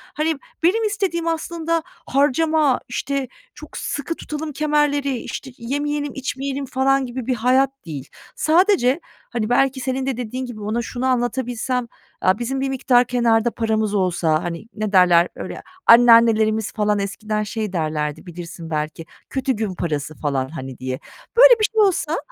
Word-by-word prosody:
hani, 315 Hz, +1 st, 0 dB, 0.3 s
benim 410 Hz, +7 st, +3 dB
istediğim 390 Hz, -6 st, -1 dB
aslında 330 Hz, 0 st, -1 dB, 0.2 s
harcama, 290 Hz, +1 st, +2 dB
işte, 275 Hz, +1 st, -2 dB, 0.3 s
çok 305 Hz, 0 st, -10 dB
sıkı 295 Hz, +3 st, -3 dB
tutalım 305 Hz, 0 st, -5 dB
kemerleri, 290 Hz, -2 st, +1 dB
işte, 265 Hz, +3 st, -7 dB
yemeyelim, 290 Hz, +4 st, -2 dB
içmeyelim, 270 Hz, +1 st, -3 dB
falan, 270 Hz, +1 st, +1 dB
gibi 250 Hz, -1 st, -6 dB
bir 255 Hz, -, +1 dB
hayat 255 Hz, +3 st, +3 dB, 0.2 s
değil. 145 Hz, -4 st, -7 dB, 0.3 s
Sadece, 330 Hz, -, +3 dB, 0.3 s
hani, 230 Hz, -3 st, -2 dB
belki 265 Hz, +2 st, +2 dB
senin 260 Hz, 0 st, -2 dB
de 265 Hz, -3 st, -2 dB
dediğin 250 Hz, +2 st, -4 dB
gibi 235 Hz, -4 st, -8 dB
ona 215 Hz, +3 st, -1 dB
şunu 245 Hz, +2 st, -4 dB
anlatabilsem: 250 Hz, 0 st, -1 dB, 0.3 s
Aaa, 185 Hz, +3 st, +2 dB
bizim 265 Hz, +3 st, -2 dB
bir 270 Hz, -, 0 dB
miktar 255 Hz, -2 st, +3 dB
kenarda 235 Hz, -2 st, +2 dB
paramız 220 Hz, -2 st, 0 dB
olsa. 175 Hz, -5 st, +1 dB
Hani, 170 Hz, +2 st, -5 dB
ne 215 Hz, -2 st, -2 dB
derler? 180 Hz, -2 st, +6 dB
Öyle, -, -, -7 dB, 0.2 s
anneannelerimiz 230 Hz, -2 st, +6 dB
falan 210 Hz, -1 st, +1 dB
eskiden 210 Hz, +2 st, -2 dB
şey 210 Hz, -1 st, -4 dB
derlerdi, 155 Hz, -2 st, -2 dB
bilirsin 170 Hz, -1 st, -8 dB
belki, 155 Hz, +1 st, -3 dB, 0.2 s
kötü 265 Hz, 0 st, 0 dB
gün 215 Hz, -4 st, -3 dB
parası 155 Hz, -3 st, -3 dB
falan 135 Hz, -3 st, -2 dB
hani, 135 Hz, -5 st, -7 dB
diye. 130 Hz, +1 st, -4 dB, 0.4 s
Böyle, -, -, +8 dB
bir -, -, 0 dB
şey 440 Hz, -, +4 dB
olsa, 360 Hz, -5 st, +2 dB
245 Hz, 150 wpm, -21 LUFS, 205-280 Hz, 0.4 s, Böyle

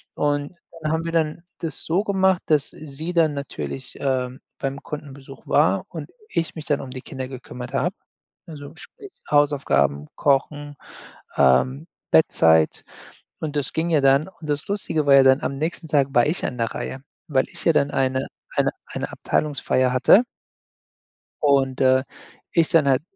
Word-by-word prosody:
Und 145 Hz, +2 st, -1 dB, 0.3 s
dann 155 Hz, -, -1 dB
haben 160 Hz, +1 st, -1 dB
wir 165 Hz, -, -2 dB
dann 160 Hz, 0 st, 0 dB, 0.2 s
das 165 Hz, -2 st, -3 dB
so 175 Hz, +5 st, +1 dB
gemacht, 190 Hz, -3 st, +2 dB
dass 150 Hz, -3 st, +2 dB
sie 155 Hz, +3 st, -7 dB
dann 165 Hz, -3 st, +3 dB
natürlich, 140 Hz, -2 st, -6 dB
ähm, 130 Hz, -2 st, -2 dB, 0.2 s
beim 135 Hz, 0 st, -3 dB
Kundenbesuch 140 Hz, -2 st, -9 dB
war -, -, +3 dB
und -, -, -7 dB, 0.2 s
ich 165 Hz, -, -2 dB
mich 155 Hz, -2 st, -7 dB
dann 145 Hz, -2 st, 0 dB
um 130 Hz, -, -8 dB
die 130 Hz, 0 st, -7 dB
Kinder 130 Hz, -1 st, -6 dB
gekümmert 125 Hz, -1 st, -9 dB
habe. -, -, 0 dB, 0.5 s
Also, 145 Hz, -1 st, -9 dB
sprich 405 Hz, -, -12 dB, 0.2 s
Hausaufgaben, 135 Hz, -, +2 dB
Kochen, 145 Hz, +1 st, 0 dB, 0.6 s
ähm, 130 Hz, -, +3 dB, 0.2 s
Bettzeit 80 Hz, -, +4 dB, 0.6 s
und 155 Hz, -2 st, -4 dB
das 145 Hz, -3 st, -2 dB
ging 160 Hz, +1 st, -1 dB
ja 155 Hz, -3 st, +4 dB
dann. 135 Hz, +4 st, +4 dB
Und 160 Hz, -5 st, -9 dB
das 145 Hz, 0 st, -1 dB
Lustige 175 Hz, -7 st, -1 dB
war 140 Hz, -, +6 dB
ja 135 Hz, -, +8 dB
dann, 130 Hz, +1 st, +5 dB
am 140 Hz, -, -2 dB
nächsten 160 Hz, +2 st, -3 dB
Tag 140 Hz, -3 st, +2 dB
war 120 Hz, -, +5 dB
ich 155 Hz, +4 st, -1 dB
an 125 Hz, -, -3 dB
der 115 Hz, -1 st, -1 dB
Reihe, 130 Hz, -, -5 dB, 0.3 s
weil 135 Hz, -4 st, +2 dB
ich -, -, -13 dB
ja 165 Hz, -, +5 dB
dann 140 Hz, -1 st, +2 dB
eine 130 Hz, 0 st, 0 dB, 0.3 s
eine -, -, +3 dB, 0.2 s
eine -, -, -5 dB
Abteilungsfeier 130 Hz, -3 st, 0 dB
hatte 130 Hz, -, +6 dB, 1.2 s
und, 135 Hz, -3 st, +2 dB
äh, 130 Hz, 0 st, +4 dB, 0.5 s
ich 165 Hz, -2 st, +3 dB
dann 155 Hz, -4 st, +4 dB
halt 135 Hz, -1 st, +3 dB
145 Hz, 165 wpm, -23 LUFS, 130-160 Hz, 1.2 s, ja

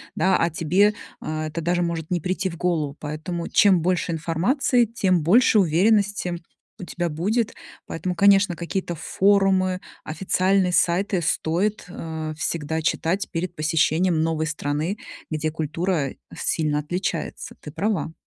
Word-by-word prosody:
Да, 190 Hz, 0 st, +3 dB
а 170 Hz, -, +1 dB
тебе, 180 Hz, +6 st, +2 dB, 0.3 s
а, 155 Hz, 0 st, -3 dB
это 155 Hz, +2 st, -5 dB
даже 175 Hz, +2 st, +1 dB
может 170 Hz, -2 st, -2 dB
не 175 Hz, -2 st, 0 dB
прийти 185 Hz, +3 st, -1 dB
в 170 Hz, -, -8 dB
голову. 160 Hz, -5 st, -1 dB
Поэтому 160 Hz, +3 st, -4 dB
чем 195 Hz, -6 st, +5 dB
больше 180 Hz, 0 st, 0 dB
информации, 195 Hz, -, +1 dB
тем 190 Hz, -6 st, +1 dB
больше 220 Hz, +6 st, +5 dB
уверенности 195 Hz, +1 st, +2 dB, 0.4 s
у -, -, -5 dB
тебя 175 Hz, -1 st, -3 dB
будет. 205 Hz, +9 st, -1 dB, 0.3 s
Поэтому, 180 Hz, +2 st, -3 dB
конечно, 195 Hz, 0 st, +4 dB
какие-то 175 Hz, +1 st, -3 dB
форумы, 190 Hz, +1 st, +2 dB, 0.2 s
официальные 185 Hz, +3 st, +1 dB
сайты 180 Hz, +2 st, +2 dB
стоит, 175 Hz, +5 st, 0 dB
э, 160 Hz, -3 st, -5 dB
всегда 160 Hz, -1 st, -2 dB
читать 170 Hz, +5 st, -1 dB
перед 175 Hz, +1 st, -3 dB
посещением 160 Hz, +2 st, +1 dB
новой 160 Hz, -1 st, 0 dB
страны, 155 Hz, +5 st, -2 dB, 0.3 s
где 155 Hz, 0 st, -2 dB
культура 160 Hz, -1 st, -2 dB, 0.2 s
сильно 150 Hz, -2 st, 0 dB
отличается. 175 Hz, +2 st, -4 dB
Ты 150 Hz, -, -9 dB
права. 185 Hz, 0 st, -1 dB
175 Hz, 135 wpm, -23 LUFS, 160-190 Hz, 0.4 s, чем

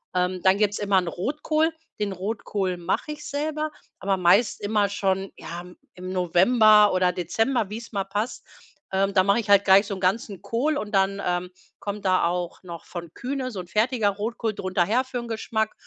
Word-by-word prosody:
Ähm, 180 Hz, 0 st, 0 dB
dann 190 Hz, +1 st, +5 dB
gibt's 205 Hz, -1 st, +1 dB
immer 200 Hz, -1 st, +2 dB
'n 180 Hz, -2 st, +1 dB
Rotkohl. 305 Hz, -, 0 dB, 0.3 s
Den 205 Hz, -1 st, -1 dB
Rotkohl 195 Hz, -1 st, -3 dB
mache 175 Hz, -, -2 dB
ich 300 Hz, 0 st, -11 dB
selber, 305 Hz, +1 st, -2 dB, 0.3 s
aber 195 Hz, 0 st, 0 dB
meist 190 Hz, +5 st, +3 dB
immer 205 Hz, -1 st, +1 dB
schon, 195 Hz, -1 st, -1 dB
ja, 170 Hz, +1 st, -7 dB
im 180 Hz, 0 st, -14 dB, 0.2 s
im 185 Hz, 0 st, -7 dB
November 210 Hz, +4 st, +5 dB
oder 185 Hz, -1 st, +3 dB
Dezember, 210 Hz, +6 st, 0 dB
wie's 225 Hz, +3 st, -7 dB
mal 200 Hz, -1 st, 0 dB
passt. 205 Hz, +5 st, -4 dB, 0.5 s
Ähm, 195 Hz, +1 st, +1 dB
da 190 Hz, -1 st, +5 dB
mache 200 Hz, +4 st, +3 dB
ich 220 Hz, -3 st, -5 dB
halt 200 Hz, -1 st, +6 dB
gleich 195 Hz, +1 st, +6 dB
so 200 Hz, -, -3 dB
'n 190 Hz, -, -9 dB
ganzen 200 Hz, +1 st, -1 dB
Kohl 280 Hz, +7 st, 0 dB
und 210 Hz, -6 st, -4 dB
dann, 195 Hz, 0 st, +2 dB
ähm, 180 Hz, 0 st, -1 dB, 0.3 s
kommt 205 Hz, 0 st, -5 dB
da 185 Hz, -2 st, +3 dB
auch 175 Hz, 0 st, -2 dB
noch 170 Hz, -2 st, -8 dB
von 170 Hz, -2 st, -8 dB
Kühne 260 Hz, 0 st, -3 dB
so 200 Hz, -7 st, -5 dB
'n 180 Hz, -, -12 dB
fertiger 220 Hz, +2 st, +1 dB
Rotkohl 215 Hz, +2 st, -3 dB
drunter 185 Hz, -2 st, 0 dB
her 235 Hz, +7 st, +2 dB
für 255 Hz, -1 st, -4 dB
'n 235 Hz, -1 st, -7 dB
Geschmack. 220 Hz, -1 st, -2 dB
200 Hz, 195 wpm, -25 LUFS, 185-225 Hz, 0.5 s, halt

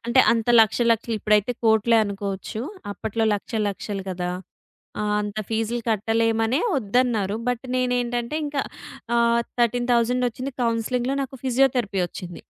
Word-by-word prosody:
అంటే 235 Hz, +2 st, +5 dB
అంత 230 Hz, 0 st, -1 dB
లక్షలు 235 Hz, +2 st, +3 dB
లక్షలు 230 Hz, 0 st, -2 dB
ఇప్పుడైతే 210 Hz, +3 st, +2 dB
కోట్లే 220 Hz, +1 st, +4 dB
అనుకోవచ్చు. 200 Hz, +2 st, -4 dB, 0.3 s
అప్పట్లో 220 Hz, +3 st, -2 dB
లక్షలు 215 Hz, +1 st, -2 dB
లక్షలు 200 Hz, 0 st, -5 dB
గదా! 180 Hz, -1 st, -3 dB, 0.7 s
ఆ! -, -, -1 dB, 0.2 s
అంత 205 Hz, +1 st, -5 dB
ఫీజ్‌లు 225 Hz, +2 st, -1 dB
కట్టలేమనే 225 Hz, -, +1 dB, 0.2 s
ఒద్దన్నారు. 220 Hz, -3 st, +1 dB
బట్ 245 Hz, 0 st, -2 dB
నేనేంటంటే 245 Hz, +1 st, -1 dB
ఇంక 290 Hz, 0 st, -6 dB, 0.6 s
ఆహ్, 235 Hz, 0 st, +3 dB, 0.2 s
13000 245 Hz, +1 st, +2 dB
ఒచ్చింది 255 Hz, +4 st, -6 dB
కౌన్సెలింగ్‌లో 240 Hz, +3 st, 0 dB
నాకు 265 Hz, 0 st, -11 dB
ఫిజియోథెరపీ 250 Hz, -6 st, +2 dB
ఒచ్చింది. 175 Hz, -2 st, -9 dB
230 Hz, 125 wpm, -23 LUFS, 210-245 Hz, 0.7 s, అంటే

